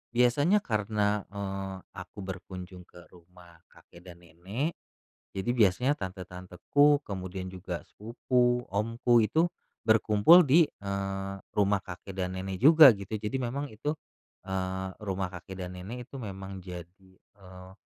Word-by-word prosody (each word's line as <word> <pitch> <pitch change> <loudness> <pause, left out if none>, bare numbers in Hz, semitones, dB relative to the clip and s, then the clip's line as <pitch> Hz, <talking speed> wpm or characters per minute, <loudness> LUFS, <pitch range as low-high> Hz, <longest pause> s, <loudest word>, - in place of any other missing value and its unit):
Biasanya 145 - +3
karena, 105 -2 0
eee, 95 -1 -5 0.2
aku - - -10
berkunjung 90 -1 -8
ke 90 0 -15
rumah 85 -1 -18
kakek 85 - -18
dan 85 0 -13
nenek, 95 - -4 0.6
jadi 95 +4 -4
biasanya 115 +6 +3
tante-tanteku, 95 +10 +1
kemudian 95 -1 -5
juga 90 -1 -6
sepupu, 125 +2 0
omku, 115 +3 +2
itu 160 - +2 0.4
berkumpul 110 +10 +6
di, 155 +3 +5
eee, 95 0 -4 0.2
rumah 100 -1 +3
kakek 95 +1 -9
dan 95 0 -2
nenek 95 0 -4
juga, 155 0 +9
gitu. 100 +1 -5
Jadi 105 +5 -3
memang 135 +3 -3
itu, 145 +8 -3 0.5
eee, 95 0 -3
rumah 95 -3 -3
kakek 95 +1 -8
dan 90 - -6
nenek 120 +7 -7
itu - - -10
memang 95 -3 -7
jadi, 90 +1 -11 0.3
eee, 95 -1 -13
100 Hz, 130 wpm, -29 LUFS, 95-120 Hz, 0.6 s, juga